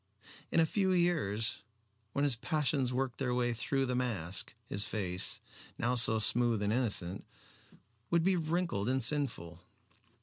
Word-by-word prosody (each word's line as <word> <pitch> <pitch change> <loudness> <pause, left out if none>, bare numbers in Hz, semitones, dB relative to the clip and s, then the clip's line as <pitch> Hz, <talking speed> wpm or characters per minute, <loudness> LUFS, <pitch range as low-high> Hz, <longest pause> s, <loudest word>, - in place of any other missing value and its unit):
In - - +3
a 165 - +5
few 190 +2 +1
years, 155 - +1 0.5
when 140 - 0
his 140 -4 +4
passions 140 0 0
worked 130 -1 -2
their 125 -3 0
way 120 -1 +1
through 135 +3 -1
the 125 - -2
mask, 105 -8 -2
his 100 - -2
face, 95 -4 -1 0.4
now 120 +2 0
so 115 -2 +4
smooth 115 0 +3
and 105 +1 +1
innocent, 100 -6 -1 0.9
would 170 -1 +2
be 190 +1 +3
wrinkled 165 - -1
and 130 -1 +1
sinful. 100 - -1
125 Hz, 145 wpm, -32 LUFS, 110-145 Hz, 0.9 s, a